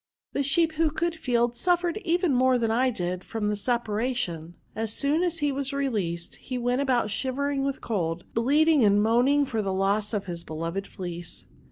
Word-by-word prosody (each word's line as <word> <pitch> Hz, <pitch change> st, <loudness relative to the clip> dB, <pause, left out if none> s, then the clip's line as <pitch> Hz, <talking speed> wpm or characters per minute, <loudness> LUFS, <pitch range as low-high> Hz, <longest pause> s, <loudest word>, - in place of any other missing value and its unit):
The -, -, 0 dB
sheep, 320 Hz, +4 st, +3 dB
who 325 Hz, -1 st, +3 dB
could 330 Hz, +3 st, -1 dB
feel, 240 Hz, -6 st, +1 dB
suf^ 350 Hz, +8 st, +1 dB
fered 350 Hz, +2 st, -1 dB
even 350 Hz, -5 st, +1 dB
more 255 Hz, 0 st, +4 dB
than 230 Hz, -2 st, 0 dB
I 255 Hz, +3 st, +3 dB
did 180 Hz, -5 st, -3 dB
from 215 Hz, -2 st, -2 dB
the 210 Hz, -, 0 dB
separ 220 Hz, 0 st, -1 dB
ation^ 175 Hz, -10 st, -3 dB, 0.2 s
As 220 Hz, 0 st, -2 dB
soon 285 Hz, +8 st, +1 dB
as 350 Hz, -2 st, 0 dB
he 290 Hz, -, +2 dB
was 275 Hz, 0 st, -3 dB
released, 205 Hz, -12 st, -2 dB
he 255 Hz, -, -5 dB
went 245 Hz, +2 st, 0 dB
about 245 Hz, -6 st, +1 dB
shivering 275 Hz, +4 st, -1 dB
with 275 Hz, -1 st, -2 dB
cold, 175 Hz, -6 st, -2 dB
bleating 290 Hz, +4 st, +4 dB
and 205 Hz, 0 st, +4 dB
moaning 255 Hz, +6 st, +3 dB
for 225 Hz, -5 st, -2 dB
the 195 Hz, -2 st, -2 dB
loss 200 Hz, +2 st, +1 dB
of 210 Hz, -3 st, -2 dB
his 170 Hz, -2 st, -5 dB
beloved 165 Hz, +5 st, -4 dB
fleece. 175 Hz, -2 st, -7 dB
240 Hz, 195 wpm, -26 LUFS, 200-280 Hz, 0.2 s, more